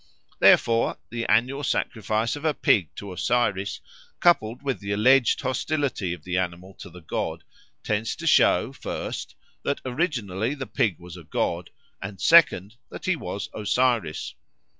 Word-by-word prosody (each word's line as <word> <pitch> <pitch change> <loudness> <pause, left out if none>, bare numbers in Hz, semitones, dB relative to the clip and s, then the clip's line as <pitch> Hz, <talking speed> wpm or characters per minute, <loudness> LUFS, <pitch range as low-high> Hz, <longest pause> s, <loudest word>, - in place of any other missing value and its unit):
Therefore, 115 0 +4
the 115 -1 -3
annual 130 +6 +2
sacrifice 110 -2 -1
of 145 - -9
a 155 -2 +1
pig 90 -7 +2
to 100 -2 -7
Osiris, 100 -2 0 0.4
coupled 125 -8 +2
with 135 -2 -2
the 100 -1 -5
alleged 125 +5 +4
hostility 130 - -1
of 85 -3 -6
the 90 +1 -1
animal 90 +1 -4
to 100 - -9
the 90 +1 -13
god, - - -3 0.4
tends 110 +1 -1
to - - -8
show, - - +4
first, - - -5 0.3
that 140 - -2
originally 125 - -1
the 135 -2 -5
pig 105 -6 0
was 90 0 -11
a 85 - -11
god, 85 +3 -2 0.3
and, 100 0 -7
second, 115 - +5
that - - -9
he 185 - +2
was 100 -9 -6
Osiris. 110 -5 0
110 Hz, 150 wpm, -25 LUFS, 95-130 Hz, 0.4 s, second